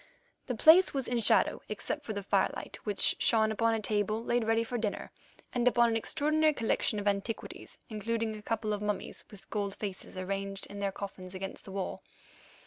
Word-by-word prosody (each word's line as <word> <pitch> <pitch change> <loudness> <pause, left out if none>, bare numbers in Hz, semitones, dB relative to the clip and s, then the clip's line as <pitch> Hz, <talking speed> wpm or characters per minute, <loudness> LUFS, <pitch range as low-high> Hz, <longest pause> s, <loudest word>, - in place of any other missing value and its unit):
The 250 - -1
place 320 - +7
was 270 -2 0
in 245 -1 0
shadow, 225 - +4
except 300 -1 -3
for 220 - -2
the 200 -1 -4
firelight, - - -1
which 205 -2 +2
shone 220 -2 +3
upon 225 +1 +2
a - - -1
table 215 +1 0
laid 240 -1 +1
ready 225 +1 +2
for 240 +1 -3
dinner, 210 -2 -3 0.4
and 245 0 +1
upon 240 -1 +5
an 225 - 0
extraordinary 310 +6 +2
collection 225 -2 0
of 205 - -3
antiquities, 205 +3 -3
including 220 +1 -2
a 210 - -9
couple 215 0 -1
of 205 - -3
mummies 210 -2 -3
with 205 -2 -14
gold 200 -2 -2
faces 195 -2 -6
arranged 195 +1 -3
in 200 - -9
their 200 -1 0
coffins 190 -1 -8
against 190 +1 -6
the 195 - -9
wall. 190 -1 -4
215 Hz, 190 wpm, -31 LUFS, 200-230 Hz, 0.4 s, place